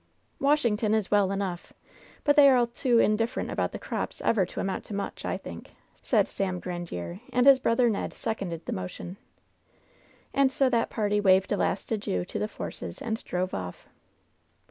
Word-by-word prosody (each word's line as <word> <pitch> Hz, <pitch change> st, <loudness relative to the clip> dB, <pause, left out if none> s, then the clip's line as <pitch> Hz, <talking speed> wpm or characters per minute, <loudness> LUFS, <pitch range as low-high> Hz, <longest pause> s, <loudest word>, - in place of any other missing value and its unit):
"Washington 235 Hz, -7 st, +2 dB
is 215 Hz, -3 st, -1 dB
well 200 Hz, -2 st, +3 dB
enough, 195 Hz, -3 st, -4 dB, 0.5 s
but 290 Hz, -, +4 dB
they 285 Hz, -2 st, +8 dB
are 260 Hz, -, +5 dB
all 240 Hz, -, +4 dB
too 240 Hz, +1 st, +1 dB
in 215 Hz, -2 st, +4 dB
different 225 Hz, +2 st, -2 dB
about -, -, -1 dB
the -, -, -5 dB
crops -, -, -4 dB
ever 195 Hz, -6 st, +2 dB
to -, -, -7 dB
amount 195 Hz, -, -2 dB
to 205 Hz, -, -6 dB
much, 200 Hz, -, -4 dB
I -, -, -1 dB
think/* -, -, -9 dB, 0.3 s
said -, -, +2 dB
Sam 185 Hz, -2 st, -2 dB
Grandiere, 175 Hz, -, -5 dB
and 250 Hz, 0 st, +3 dB
his 275 Hz, -1 st, +8 dB
brother 240 Hz, 0 st, +3 dB
Ned 215 Hz, -3 st, -1 dB
sec 220 Hz, -, -3 dB
onded 170 Hz, -4 st, -5 dB
the -, -, -4 dB
motion. 95 Hz, -, -6 dB, 1.2 s
And 275 Hz, -1 st, +3 dB
so 265 Hz, -1 st, +2 dB
that 230 Hz, -2 st, +1 dB
party 210 Hz, -1 st, 0 dB
waved 190 Hz, -1 st, +4 dB
a 205 Hz, -, +2 dB
last -, -, -1 dB
adieu 200 Hz, -, -1 dB
to -, -, -5 dB
the -, -, -1 dB
Forces 85 Hz, -, -7 dB
and 225 Hz, -1 st, -3 dB
drove 185 Hz, +1 st, -2 dB
off. 90 Hz, -2 st, -6 dB
210 Hz, 190 wpm, -27 LUFS, 185-240 Hz, 1.2 s, they